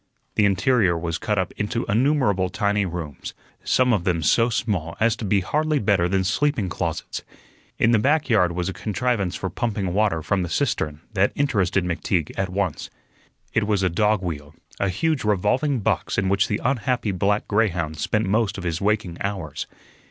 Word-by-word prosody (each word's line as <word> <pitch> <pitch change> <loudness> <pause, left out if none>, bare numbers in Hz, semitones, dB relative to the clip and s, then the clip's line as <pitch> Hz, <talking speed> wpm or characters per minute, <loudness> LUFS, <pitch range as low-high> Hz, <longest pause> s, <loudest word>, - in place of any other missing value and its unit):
The 105 - +3
interior 100 -1 +3
was 85 -1 -3
cut 105 -2 -1
up 95 -2 0
into 105 +3 -2
innumerable 110 -5 +2
tiny 105 0 0
rooms, 80 -5 -6 0.3
some 125 -1 +3
of 100 -5 +1
them 85 -3 0
so 115 +9 +4
small 95 -8 -2
as 110 0 +3
to 115 - -5
be 100 0 +2
hardly 155 - 0
better 95 -7 +2
than 95 0 +1
sleeping 100 +2 0
closets. - - -3 0.6
In 115 - +3
the 115 - +4
back 150 +6 +2
yard 90 -7 +3
was 90 0 -2
a 95 - -2
contrivance 105 -4 -1
for 95 - -3
pumping 100 -6 -2
water 100 -6 +1
from 95 +3 0
the 90 - -3
cistern 80 - -1
that 100 0 +2
interested 100 -9 +1
McTeague 85 -2 -1
at 95 -1 -1
once. 95 -4 -2 0.6
It 105 -2 +1
was 100 -3 +1
a 95 - +3
dog 105 +3 +1
wheel, 75 -3 -5 0.2
a 100 - +1
huge 155 - 0
revolving 105 +7 +1
box - - 0
in 95 -1 +1
which 100 0 +2
the 105 - -1
unhappy 125 -3 0
black 100 +2 0
greyhound 90 -8 0
spent 110 +7 0
most 105 +1 +1
of 95 - -6
his 85 -1 -2
waking 100 -4 0
hours. 95 -8 -4
100 Hz, 180 wpm, -23 LUFS, 90-110 Hz, 0.6 s, so